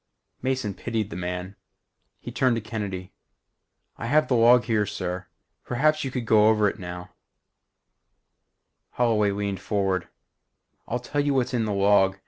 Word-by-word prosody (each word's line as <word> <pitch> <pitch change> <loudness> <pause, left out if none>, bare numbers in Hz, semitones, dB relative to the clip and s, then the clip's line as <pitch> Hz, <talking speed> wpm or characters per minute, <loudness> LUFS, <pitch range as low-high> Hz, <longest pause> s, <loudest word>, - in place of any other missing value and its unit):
_" - - -36
Mason 130 -6 -1
pitied 110 0 -3
the - - -6
man. 90 +2 -4 0.6
He - - -8
turned 130 -2 +2
to - - -1
Kennedy. 100 -4 -5 0.9
"I 115 - -4
have 150 +4 +3
the - - +2
log 120 +1 +6
here, 110 -3 +1
sir. 90 0 -4 0.4
Perhaps 155 +5 +1
you 135 - -2
could 125 -2 -4
go 110 -1 +5
over 105 -1 +3
it 105 - -3
now 90 -1 -7 0.9
" - - -53
Holloway 110 -4 +2
leaned 100 -1 -2
forward. 95 -3 -1 0.8
"I'll 120 - -1
tell 135 +4 -2
you 145 -1 +1
what's 130 -1 0
in 115 -3 +1
the 105 - -2
log. 100 -1 +3
105 Hz, 160 wpm, -25 LUFS, 95-125 Hz, 0.9 s, log